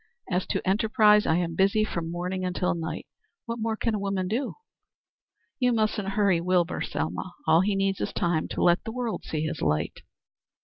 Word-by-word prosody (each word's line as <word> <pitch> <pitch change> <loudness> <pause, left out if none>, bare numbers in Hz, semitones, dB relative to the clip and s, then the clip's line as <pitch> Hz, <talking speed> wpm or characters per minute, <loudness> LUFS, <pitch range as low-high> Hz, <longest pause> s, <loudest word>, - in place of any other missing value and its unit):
As 180 +1 0
to - - -2
enterprise, 210 +1 +4
I 160 - +3
am 170 -1 0
busy 200 +4 +3
from 170 -6 -3
morning 180 +2 -3
until 180 -1 0
night. 165 -1 -4 0.4
What 230 0 -4
more 220 0 -1
can 230 0 0
a 210 - -1
woman 195 -2 -1
do? 240 +6 -2 1.0
You 250 -2 +3
mustn't 215 -3 0
hurry 195 -5 +3
Wilbur, 180 -1 +1
Selma. 90 - -3
All 165 - +5
he 200 +1 +1
needs 195 0 0
is - - -1
time 170 -3 0
to - - -2
let 175 0 +4
the 225 - -5
world 240 -1 -3
see 155 - -3
his 160 0 -3
light." 75 0 0
190 Hz, 185 wpm, -27 LUFS, 170-215 Hz, 1.0 s, All